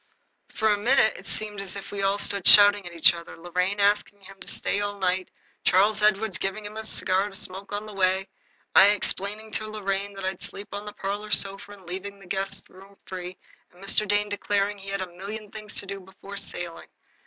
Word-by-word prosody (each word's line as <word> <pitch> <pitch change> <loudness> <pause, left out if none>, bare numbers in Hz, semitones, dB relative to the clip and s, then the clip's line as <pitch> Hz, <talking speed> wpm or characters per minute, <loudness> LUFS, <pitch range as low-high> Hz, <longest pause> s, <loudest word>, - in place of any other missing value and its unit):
For 220 -1 +1
a 205 -1 +2
minute 230 0 +4
it 195 - -10
seemed 210 -2 -1
as 195 -1 -5
if 200 - -8
we 200 -1 -3
all 195 +1 +2
stood 200 -2 +1
shouting 205 -2 +9
at - - -7
one 170 -2 -12
another, 170 0 -9
Lorraine 180 +4 -1
asking 205 0 +1
him 195 0 -14
to - - -11
stay 205 - -1
all 205 0 -3
night, 185 -1 0 0.3
Charles 205 +3 +4
Edward 210 -2 +2
giving 195 +2 -3
him 210 +1 -7
a 220 - -4
cigar 195 -2 +1
to 195 - -10
smoke 195 +1 -4
on 205 +1 -3
the 215 - -9
way, 190 0 +1 0.5
I 195 - +9
explaining 210 +1 -1
to 215 0 -2
Lorraine 200 -1 -3
that 195 -1 -5
I'd 190 -1 -3
sleep 200 +1 -6
on 205 +1 -5
the 210 - -6
parlor 205 +2 -4
sofa 195 0 +2
and 195 -2 -15
leave 180 +2 -5
the 200 0 -10
guest 195 +2 -3
room 195 +2 -16
free, 185 -1 -7 0.3
and 175 - -21
Mr. 210 +2 +2
Dane 205 +1 +1
declaring 205 0 -1
he'd 195 0 -4
got 185 -1 -4
a 175 - -18
million 205 +2 -7
things 215 -1 -9
to - - -1
do 195 0 -6
before 190 +1 -11
sailing. 175 -3 -6
200 Hz, 215 wpm, -26 LUFS, 190-205 Hz, 0.5 s, shouting